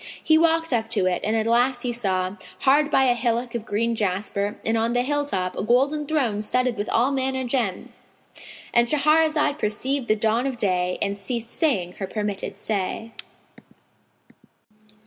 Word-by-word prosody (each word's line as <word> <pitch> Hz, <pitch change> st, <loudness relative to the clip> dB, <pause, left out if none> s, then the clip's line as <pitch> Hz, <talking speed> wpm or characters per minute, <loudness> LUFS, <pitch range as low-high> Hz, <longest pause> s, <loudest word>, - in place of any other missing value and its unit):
He 315 Hz, -, +4 dB
walked 325 Hz, -1 st, +2 dB
up 225 Hz, -2 st, 0 dB
to 220 Hz, -5 st, 0 dB
it 180 Hz, -1 st, 0 dB
and 215 Hz, +2 st, 0 dB
at 220 Hz, -1 st, +1 dB
last 245 Hz, +2 st, +2 dB
he 245 Hz, -, -1 dB
saw, 190 Hz, -5 st, -1 dB, 0.3 s
hard 290 Hz, +2 st, +4 dB
by 270 Hz, -, +4 dB
a 250 Hz, -2 st, +4 dB
hillock 240 Hz, 0 st, -1 dB
of 235 Hz, -1 st, -5 dB
green 230 Hz, +3 st, 0 dB
jasper 200 Hz, 0 st, -2 dB
and 225 Hz, -, +1 dB
on 230 Hz, +1 st, +1 dB
the 245 Hz, 0 st, +2 dB
hill 290 Hz, +2 st, 0 dB
top, 185 Hz, -9 st, -2 dB
a -, -, -3 dB
golden 275 Hz, +7 st, +1 dB
throne 250 Hz, -10 st, 0 dB
studded 250 Hz, +3 st, 0 dB
with 205 Hz, 0 st, -4 dB
all 245 Hz, +4 st, +2 dB
manner 265 Hz, -1 st, -1 dB
gems,—And 235 Hz, 0 st, -3 dB
Shahrazad 305 Hz, +1 st, +2 dB
perceived 250 Hz, +5 st, -1 dB
the 215 Hz, -, +3 dB
dawn 225 Hz, +4 st, +1 dB
of 260 Hz, -2 st, -4 dB
day 180 Hz, -3 st, 0 dB
and 200 Hz, -, -1 dB
ceased 235 Hz, +2 st, -5 dB
saying 195 Hz, -, 0 dB
her 195 Hz, -, -3 dB
permitted 205 Hz, -1 st, -4 dB
say. 215 Hz, +2 st, -3 dB
235 Hz, 165 wpm, -23 LUFS, 210-265 Hz, 0.3 s, He